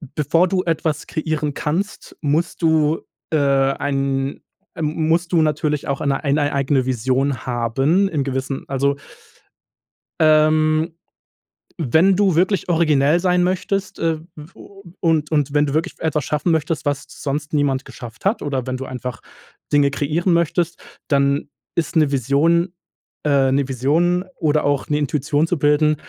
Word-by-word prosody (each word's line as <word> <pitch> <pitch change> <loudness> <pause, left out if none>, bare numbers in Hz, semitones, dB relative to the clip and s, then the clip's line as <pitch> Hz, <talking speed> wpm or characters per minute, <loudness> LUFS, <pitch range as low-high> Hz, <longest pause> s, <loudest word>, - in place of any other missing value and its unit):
bevor 165 +5 +2
du 185 0 0
etwas 160 -2 -1
kreieren 155 -2 -2
kannst, 180 +10 -3
musst 160 +4 -1
du 160 -1 +2 0.3
äh, 155 - +2
ein, 135 0 0 0.3
m 155 0 -1
musst 175 +2 +1
du 165 - +5
natürlich 150 -1 0
auch 140 - -1
eine 140 0 -1
ein 140 +1 +1
ei 145 -1 0
eigene 140 -1 +1
Vision 130 +1 -1
haben, 135 - +1
in 150 -6 -1
gewissen, 135 0 -3
also 140 +1 +1 1.3
ähm, 155 +1 +3 0.8
wenn 165 +6 +3
du 195 -4 +2
wirklich 185 0 +1
originell 155 -1 +3
sein 180 -1 +2
möchtest, 190 +2 -2
äh, 165 -1 0 0.2
w 155 +3 -12
u 195 0 -15 0.2
und 160 -3 +1
und 145 -2 +1
wenn 145 0 +3
du 140 - -3
wirklich 160 +1 -1
etwas 155 -3 -1
schaffen 150 +5 0
möchtest, 155 -1 -1
was 145 -1 -1
sonst 145 +1 -4
niemand 140 -2 +1
geschafft 120 +5 -11
hat 210 +4 +1
oder 135 -3 -2
wenn 130 0 -2
du 135 - -6
einfach 125 -1 -6 0.5
Dinge 145 -1 +4
kreieren 160 +6 0
möchtest, 170 0 0 0.3
dann 140 0 +1 0.3
ist 170 +1 -1
'ne 150 -3 +3
Vision 160 +7 +2 0.5
äh, 135 -2 +3
'ne 140 0 +1
Vision 160 +8 +1
oder 155 -2 +1
auch, 145 -1 0
ne, 150 - +1
Intuition 150 +2 0
zu 175 - 0
bilden, 150 +1 +3
150 Hz, 150 wpm, -20 LUFS, 140-165 Hz, 1.3 s, du